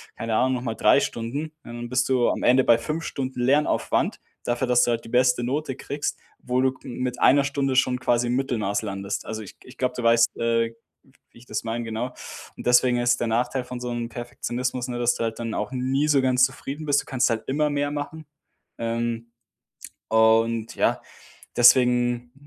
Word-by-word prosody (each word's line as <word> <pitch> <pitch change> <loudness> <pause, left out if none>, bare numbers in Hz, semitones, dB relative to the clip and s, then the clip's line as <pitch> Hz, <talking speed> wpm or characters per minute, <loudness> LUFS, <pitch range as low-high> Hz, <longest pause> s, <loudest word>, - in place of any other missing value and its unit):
keine 115 -1 -2
Ahnung, 130 +3 +2
noch 125 - -2
mal 115 -3 -3
3 - - +5
Stunden, 120 +5 -3 0.2
und - - -37
dann 120 0 -7
bist 125 0 +1
du 125 -2 +3
am - - -2
Ende 130 +1 +5
bei 115 - +5
5 150 +8 -4
Stunden 130 -2 -4
Lernaufwand 140 +5 +1 0.2
dafür, 120 +2 -1
dass 125 0 +4
du 120 - +2
halt 115 -1 -2
die - - -10
beste 125 0 +3
Note 135 +2 -2
kriegst, 145 +2 -4 0.2
wo 125 0 -1
du 130 0 +2
mit 125 0 -4
einer 140 +2 +5
Stunde 140 -1 -1
schon 125 -1 +2
quasi 120 -1 +1
im 120 - 0
Mittelmaß 110 -6 -1
landest. 100 -1 -4
Also, 110 0 -5
ich 100 - -11
ich 125 0 -15
glaube, 125 -1 -1
du 125 - -3
weißt, 115 0 +3
äh, 115 0 0 0.6
wie - - -20
ich 125 - -18
das 110 - -3
meine, 115 +1 -3
genau. 115 +3 -4 0.4
Und - - -6
deswegen 125 0 +4
ist 120 0 +2
der - - 0
Nachteil 125 +3 0
von 125 0 -7
so 125 0 -4
'nem 120 0 -4
Perfektionismus, 125 +1 -4
ne, 120 -1 -4
dass 120 0 +2
du - - -3
halt 115 -1 -3
dann 115 -1 -4
auch 105 +3 -3
nie 135 +3 0
so 145 -3 +4
ganz 130 -1 +3
zufrieden 135 +3 -6
bist. 145 -1 +2
Du - - -17
kannst 130 -1 +1
halt 110 -1 -2
immer 150 +2 +1
mehr 145 0 0
machen, 150 +2 -5 0.5
ähm, 115 0 -2 0.8
und 115 0 +3
ja, - - +1 0.6
deswegen 120 0 +4
125 Hz, 205 wpm, -24 LUFS, 115-130 Hz, 0.8 s, 3